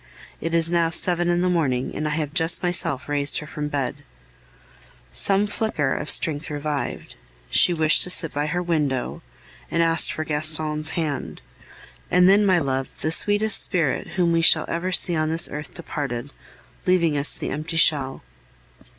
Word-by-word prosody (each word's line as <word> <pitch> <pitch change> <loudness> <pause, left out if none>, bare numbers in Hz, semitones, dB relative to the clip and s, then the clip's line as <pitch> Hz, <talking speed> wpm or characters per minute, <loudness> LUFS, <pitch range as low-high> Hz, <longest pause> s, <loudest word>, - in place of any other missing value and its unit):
It 165 0 -2
is 165 0 +2
now 170 -1 +2
seven 175 +1 0
in 175 0 +1
the 180 - +1
morning, 145 -8 -1
and 150 - -2
I 150 0 -2
have 150 -2 -3
just 165 +1 +4
myself 175 -6 -1
raised 145 -1 +2
her 150 - -4
from 150 0 -5
bed. 140 -2 -3 1.1
Some 195 - +1
flicker 205 -9 -2
of 150 - -4
strength 155 0 0
revived; 150 -1 -4 0.4
she - - +5
wished 155 -2 +3
to - - +2
sit 165 -3 +1
by 145 +1 -2
her 175 +3 -2
window, 150 -7 -2 0.5
and 170 - +1
asked 165 -1 +3
for 155 - -4
Gaston's 155 +1 -1
hand. 150 - -4 0.7
And 180 0 +4
then, 200 +2 +4
my 185 -2 +4
love, 135 -4 -2
the 155 - -1
sweetest 205 +5 +3
spirit 165 -7 +1
whom 175 -2 +2
we 165 0 +2
shall 165 - +4
ever 175 +2 -3
see 175 -1 +2
on 155 0 0
this 165 +1 +1
earth 150 +1 -7
departed, 145 -6 -5 0.6
leaving 170 -4 +2
us 145 +1 +1
the - - -5
empty 155 +3 -4
shell. 140 -5 +1
160 Hz, 170 wpm, -22 LUFS, 145-175 Hz, 1.1 s, she